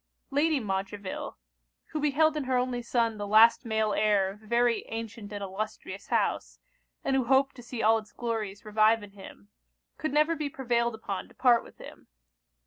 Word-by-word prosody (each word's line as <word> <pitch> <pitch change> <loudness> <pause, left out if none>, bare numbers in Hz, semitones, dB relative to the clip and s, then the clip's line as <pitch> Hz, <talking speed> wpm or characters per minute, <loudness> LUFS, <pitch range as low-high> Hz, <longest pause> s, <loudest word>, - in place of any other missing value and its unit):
Lady 295 +1 +2
Montreville, 195 -2 -4 0.5
who 310 - -3
beheld 300 +1 +2
in 300 -3 -2
her 255 -1 +1
only 250 -1 -1
son 230 -2 0
the 205 - -3
last 220 +4 +6
male 220 -2 0
heir 205 -3 +2
of 205 +2 -14
a 215 - -17
very 235 0 +2
ancient 225 -2 -6
and 205 -1 -5
illustrious 200 +3 -6
house, - - -1 0.5
and 270 - +1
who 260 -2 +1
hoped 270 +2 +3
to - - -9
see 240 -1 -5
all 225 +1 +5
its 215 -1 -15
glories 215 -3 -4
revive 215 +1 +3
in 205 - -11
him, 190 - -13 0.5
could 310 - -2
never 305 +3 +3
be 300 -2 -3
prevailed 235 -3 0
upon 200 -3 -5
to - - -21
part 245 -3 +4
with - - -16
him. - - -13
230 Hz, 185 wpm, -28 LUFS, 210-255 Hz, 0.5 s, last